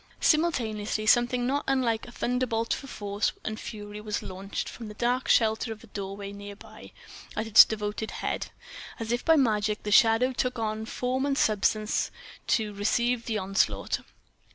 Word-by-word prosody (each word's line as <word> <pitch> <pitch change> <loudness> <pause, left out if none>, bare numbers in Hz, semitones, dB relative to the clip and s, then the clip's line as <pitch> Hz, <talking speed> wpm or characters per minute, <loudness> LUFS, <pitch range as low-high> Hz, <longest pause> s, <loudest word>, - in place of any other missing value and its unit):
Simultaneously 220 -10 +1
something 245 +2 +3
not 280 +3 0
unlike 250 -4 +1
a - - -10
thunderbolt 240 -2 -1
for 275 - -6
force 205 -3 -2
and 215 0 -3
fury 210 -1 -7
was 210 -1 -3
launched, 190 +2 -5
from 230 - -8
the 210 - -9
dark 245 +3 0
shelter 220 0 +3
of 220 0 -8
a - - -11
doorway 200 -1 -6
near 200 0 -9
by, - - -13 0.5
at 215 - -1
its 220 -1 +10
devoted 210 0 -4
head. - - -3 0.5
And 230 - -4
as 220 - -4
if 240 0 0
by 325 - +5
magic 215 -6 +1
the 210 - -3
shadow 225 +4 +5
took 250 0 -1
on 220 -1 -3
form 255 +2 -1
and 280 -1 0
substance 215 -1 +1 0.4
to 215 -3 +1
receive 235 +4 0
the 220 -2 0
onslaught. 195 0 0
220 Hz, 170 wpm, -27 LUFS, 210-245 Hz, 0.5 s, its